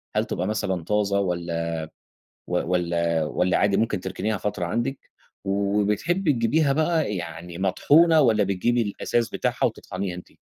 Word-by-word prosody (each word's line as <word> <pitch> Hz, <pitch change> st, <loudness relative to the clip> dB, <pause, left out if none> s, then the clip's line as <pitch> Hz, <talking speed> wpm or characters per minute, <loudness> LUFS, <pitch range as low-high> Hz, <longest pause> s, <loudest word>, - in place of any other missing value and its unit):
هل -, -, +2 dB
تبقى 90 Hz, -, -3 dB
مثلًا 95 Hz, -5 st, -1 dB
طازة 100 Hz, +1 st, +1 dB
والّا 85 Hz, -3 st, -2 dB, 0.8 s
و -, -, -8 dB, 0.2 s
والّا 85 Hz, -2 st, +1 dB
والّا 90 Hz, +4 st, +1 dB
عادي 100 Hz, -1 st, +2 dB
ممكن 105 Hz, -2 st, 0 dB
تركنيها 105 Hz, +3 st, -2 dB
فترة 100 Hz, -2 st, -2 dB
عندِك، 120 Hz, +9 st, -3 dB, 0.3 s
وبتحبي 105 Hz, -, +1 dB
تجيبيها 140 Hz, +5 st, +2 dB
بقى 155 Hz, -, +1 dB
يعني 85 Hz, 0 st, -7 dB
مطحونة 155 Hz, -, +4 dB
والّا 110 Hz, -6 st, +4 dB
بتجيبي 110 Hz, +5 st, +1 dB
الأساس 115 Hz, +2 st, -1 dB
بتاعها -, -, -1 dB
وتطحنيه 95 Hz, -1 st, -3 dB
أنتِ؟ 90 Hz, -, -10 dB
100 Hz, 140 wpm, -24 LUFS, 90-120 Hz, 0.8 s, مطحونة